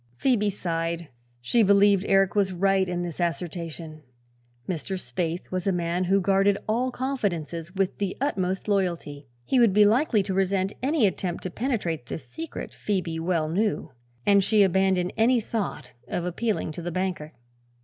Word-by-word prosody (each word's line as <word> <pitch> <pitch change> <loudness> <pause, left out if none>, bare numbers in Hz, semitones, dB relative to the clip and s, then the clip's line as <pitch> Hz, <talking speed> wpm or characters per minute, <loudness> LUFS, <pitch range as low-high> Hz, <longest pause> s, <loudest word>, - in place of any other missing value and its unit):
Phoebe 230 -6 +2
sighed. 170 -3 -3 0.3
She 230 - +2
believed 200 -1 +5
Eric 195 0 +3
was 200 -2 +2
right 190 +1 +2
in 175 0 -2
this 175 -2 -6
assertion. 165 -2 -4 0.7
Mr. 185 +2 -3
Spaythe 165 +6 -4
was 185 0 -2
a - - +4
man 175 0 -1
who 195 +2 +3
guarded 195 +1 +3
all 240 +4 +1
confidences 185 - -3
with 195 -1 -1
the 200 -2 -2
utmost 190 -10 -1
loyalty. 170 -8 -1 0.2
He 255 - +2
would 230 -5 +5
be 210 +1 +6
likely 220 -1 +3
to 190 - -3
resent 190 +1 +1
any 275 -1 +2
attempt 180 -2 -2
to 185 - -4
penetrate 175 - -2
this 160 - -6
secret, 325 0 -7
Phoebe 180 -5 -2
well 165 -2 0
knew, 200 +3 -1 0.3
and 200 -1 +5
she 210 +1 +4
abandoned 190 -1 +2
any 235 +2 +4
thought 200 - -4
of 175 - -2
appealing 200 0 -1
to 165 - -7
the 175 +1 -4
banker. 180 -4 -3
190 Hz, 160 wpm, -26 LUFS, 170-205 Hz, 0.7 s, be